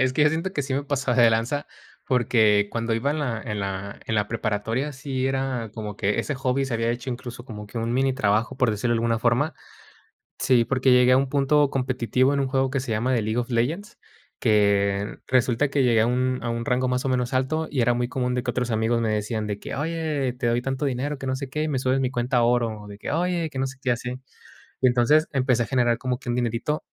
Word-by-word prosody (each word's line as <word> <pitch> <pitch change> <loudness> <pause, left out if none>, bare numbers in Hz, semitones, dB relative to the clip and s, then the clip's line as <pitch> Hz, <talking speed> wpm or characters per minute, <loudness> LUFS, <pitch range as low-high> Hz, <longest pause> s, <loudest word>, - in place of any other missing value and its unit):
es 130 0 +2
que 150 - +3
yo 150 - +6
siento 165 +4 -2
que 145 - -1
sí 135 - -4
me 140 +2 0
pasaba 135 -3 -1
de 115 - +7
lanza, 115 +6 0 0.4
porque 110 -5 +3
cuando 115 0 -1
iba 130 +5 0
en 155 - -1
la 120 -7 -2
en 105 -4 -3
la 100 +1 -5
en 110 - -1
la 105 -1 +1
preparatoria, 115 +5 -2
sí 135 -1 -3
era 135 -4 -2
como 105 -2 -5
que 105 0 0
ese 145 - -3
hobby 135 0 0
se 135 - -5
había 115 0 0
hecho 120 +2 -4
incluso 120 -1 -7
como 105 -5 -8
que 105 - -12
un 115 +1 -1
mini 135 +1 +1
trabajo, 110 +1 +1
por 125 -4 +2
decirlo 120 +3 0
de 115 - +1
alguna 115 0 +1
forma. 120 +7 +1 0.9
Sí, 120 -3 +3
porque 130 +1 +2
llegué 125 0 +6
a 130 - +6
un 135 0 +1
punto 145 +1 +3
competitivo 130 0 +1
en 140 - 0
un 135 - 0
juego 135 0 +1
que 135 +1 -1
se 125 - -5
llama 115 +4 0
The 115 - +1
League 110 +2 -2
of 120 0 -1
Legends, 150 - -1 0.4
que 100 -1 +2
resulta 130 +2 +2
que 140 -1 +1
llegué 115 -3 +4
a - - +3
un 125 +1 0
a 120 - -2
un 115 0 -3
rango 125 0 +1
más 125 +1 -1
o 135 - +1
menos 125 -1 0
alto, 145 +5 0
y 140 - -1
era 120 0 +3
muy 120 0 -1
común 125 -1 -1
de 125 - -1
que 125 - -1
otros 125 0 -2
amigos 110 +1 +1
me 115 -1 0
decían 110 0 -2
de 105 -1 -3
que: - - -6
"Oye, 150 -3 -1
te 125 -1 -2
doy 120 +1 +1
tanto 135 +2 -3
dinero, 140 +2 -2
que 135 - -7
no 130 - 0
sé 140 -1 -6
qué, 150 +3 -2
y - - -1
me 135 -3 0
subes 130 +1 +1
mi 130 - +1
cuenta 125 0 0
a 120 - +4
oro", 115 -3 +1
o 105 - -11
de 100 - -10
que: - - -5
"Oye, 170 +1 0
que 135 -3 -6
no 135 - 0
sé 135 0 -9
qué", 125 - -2
y - - +5
así. 125 +1 -5 0.7
Y - - +2
entonces 125 +6 +4
empecé 130 -3 +2
a - - -4
generar 120 0 +2
como 125 0 -2
que 125 - -7
un 120 - 0
dinerito, 120 +5 -1
125 Hz, 260 wpm, -24 LUFS, 115-135 Hz, 0.9 s, de